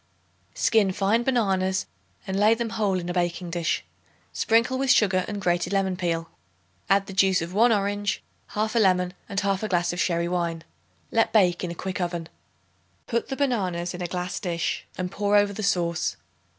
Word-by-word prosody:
Skin 215 -4 +3
fine 200 +5 +1
bananas 190 -7 +1 0.4
and 190 0 -2
lay 215 +2 +5
them 230 -1 -3
whole 210 -4 0
in 175 - -6
a 175 - -2
baking 175 0 -1
dish. 170 -1 -1 0.5
Sprinkle 230 +3 +2
with 270 0 0
sugar 190 -6 +4
and 205 -1 -4
grated 175 0 0
lemon 190 -1 +1
peel. 165 -2 -2 0.6
Add 195 0 +4
the 195 - -8
juice 190 -1 +3
of 170 +2 -5
1 230 +4 +5
orange, 205 -1 0 0.3
1/2 220 +2 +1
lemon 180 -2 +2 0.2
and 200 - -1
1/2 200 +1 -1
glass 175 -1 +1
of 175 - -5
sherry 170 -2 +1
wine. 170 -2 -2 0.5
Let 225 0 +2
bake 180 -5 +3
in 180 - -2
a 170 - -5
quick 190 +2 -4
oven. 170 -2 -3 0.8
Put 235 -1 -1
the 270 - -2
bananas 185 -11 -1
in 180 - -7
a 175 - -2
glass 180 +1 -3
dish 170 -3 -2
and 180 -1 -3
pour 205 +1 +1
over 205 0 +4
the 215 - -5
sauce. 175 -4 0
190 Hz, 180 wpm, -25 LUFS, 175-210 Hz, 0.8 s, lay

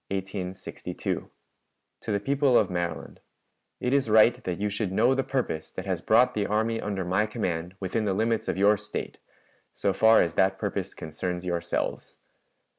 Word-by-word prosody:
_ 95 -1 -4 0.7
"TO 110 - -4
THE 100 - +1
PEOPLE 135 +2 +3
OF - - +2
MARYLAND: 85 -1 -4 0.6
It 125 - 0
is 140 -5 +2
right 110 +2 +5
that 90 -1 -2
you 105 - 0
should 105 -1 -2
know 115 +7 +3
the 135 0 0
purpose 130 -12 -2
that - - -7
has - - -2
brought 125 0 +4
the 105 -1 -1
army 110 +2 0
under 95 -3 -3
my 95 +5 +1
command 90 -5 -3
within 105 +3 -1
the 95 -2 0
limits 115 +2 0
of - - -1
your 100 +2 +5
State, 105 +1 -6 0.5
so 100 - 0
far 110 +3 +6
as 85 - -2
that 95 +1 +2
purpose - - -3
concerns 90 +3 -4
yourselves. 85 -1 -3
100 Hz, 170 wpm, -27 LUFS, 90-115 Hz, 0.7 s, far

